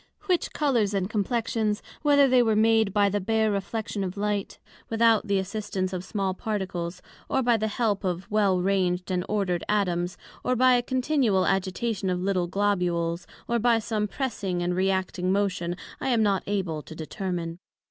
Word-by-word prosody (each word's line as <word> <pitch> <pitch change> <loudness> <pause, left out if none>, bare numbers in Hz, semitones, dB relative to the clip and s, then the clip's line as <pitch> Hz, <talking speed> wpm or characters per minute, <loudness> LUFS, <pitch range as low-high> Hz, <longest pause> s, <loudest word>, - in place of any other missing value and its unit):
Which 365 -4 0
Colours 235 -9 +1
and 190 -1 0
Complexions, 215 0 -1 0.2
whether 285 -1 +5
they 255 -1 +5
were 220 -2 +2
made 220 -1 +4
by 205 0 +3
the 205 +1 0
bare 220 +2 +1
reflection 205 +1 -3
of 190 +1 -4
light, 205 -1 -2 0.3
without 225 -1 +3
the 200 -1 +2
assistance 190 -1 -3
of 180 -1 -3
small 195 -1 -2
particles; 185 -4 -4 0.3
or 265 - +1
by 240 -1 +4
the 220 0 -1
help 210 -2 0
of 180 -1 -2
well 200 -3 +3
ranged 180 -1 0
and 180 -1 0
order'd 190 -5 0
Atoms; 175 -4 0 0.3
or 255 - +1
by 255 +1 +5
a 245 - +4
continual 255 -6 +1
agitation 195 +1 -1
of 180 -1 0
little 185 -1 0
Globules; 175 -3 0 0.2
or 235 0 +1
by 235 0 +4
some 215 -1 -1
pressing 200 -8 -2
and 175 0 0
re 190 +1 +2
acting 185 -1 -1
motion, 185 -3 0 0.2
I - - -2
am 235 -3 +3
not 200 -3 +2
able 185 -6 -1
to 160 - -11
determine. 170 0 -4
200 Hz, 175 wpm, -26 LUFS, 185-225 Hz, 0.3 s, whether